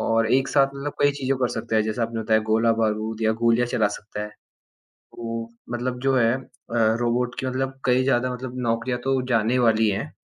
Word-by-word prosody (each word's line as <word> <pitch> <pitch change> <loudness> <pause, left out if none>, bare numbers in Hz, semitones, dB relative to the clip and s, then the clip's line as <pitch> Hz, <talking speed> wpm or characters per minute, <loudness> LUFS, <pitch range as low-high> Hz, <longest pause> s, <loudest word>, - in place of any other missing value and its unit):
और 115 0 +2
एक 135 +1 +3
साथ 140 -2 +4
मतलब 140 +1 -4
कई 145 - +5
चीज़ों 135 -1 -1
कर 125 -2 +1
सकता 115 0 -2
है। 110 - +4
जैसे 110 +2 -2
आपने 115 0 -2
बताया 110 0 +3
गोला-बारूद 110 -1 +1
या 110 0 +3
गोलियाँ 115 +1 +3
चला 120 -4 +1
सकता 105 0 -6
है। 105 - -5 0.6
तो 115 0 -7 0.3
मतलब 125 +1 -2
जो 135 0 +2
है 115 -1 +3
अ, - - -7 0.6
रोबोट 120 +1 0
के 130 - -3
मतलब 135 +1 -3
कई 125 0 +3
ज़्यादा 125 -1 +1
मतलब 125 0 -7
नौकरियाँ 115 +2 -1
तो 135 0 +1
जाने 115 +1 +2
वाली 110 -2 +3
हैं। 100 - -3
120 Hz, 200 wpm, -24 LUFS, 110-130 Hz, 0.6 s, कई